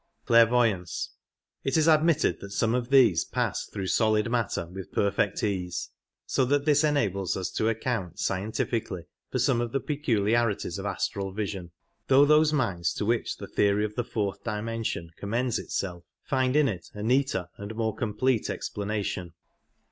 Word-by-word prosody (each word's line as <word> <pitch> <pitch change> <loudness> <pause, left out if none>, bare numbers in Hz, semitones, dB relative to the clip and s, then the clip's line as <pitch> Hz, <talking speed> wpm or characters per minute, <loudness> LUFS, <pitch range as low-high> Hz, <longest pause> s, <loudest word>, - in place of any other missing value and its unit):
It 135 - +1
is 160 0 +3
admitted 160 0 +3
that 100 - -8
some 110 +3 +1
of 125 -1 -1
these 125 -11 +5
pass - - -2
through 95 - -5
solid 110 +3 +2
matter 115 -8 0
with 95 +2 -9
perfect 100 0 0
ease, 90 -4 -2 0.3
so 130 - +1
that 140 +2 +1
this 150 -1 +4
enables 100 - +1
us 95 - -3
to 110 - +1
account 110 -6 -2
scien 95 +2 -1
tifically 110 -7 -2 0.3
for - - -1
some 120 - +2
of 120 -1 -3
the 135 - +2
peculiarities 115 - 0
of 100 - -3
astral 100 0 -2
vision, 95 -4 -4 0.4
though 135 +2 +6
those 150 +1 +5
minds 95 - 0
to - - -2
which 115 +2 0
the - - -7
theory 105 +1 +2
of 105 - -5
the 120 - -1
fourth 105 -4 -3
dimension 110 -6 -3
commends 115 +4 -1
itself 90 -3 -4 0.2
find 130 0 +1
in 150 -2 +5
it 95 -8 -4
a 105 - -5
neater 125 -7 +1
and 100 +2 -7
more 110 -1 -1
complete 115 +1 0
ex - - -4
planation. 100 -4 -3
110 Hz, 165 wpm, -27 LUFS, 100-130 Hz, 0.4 s, though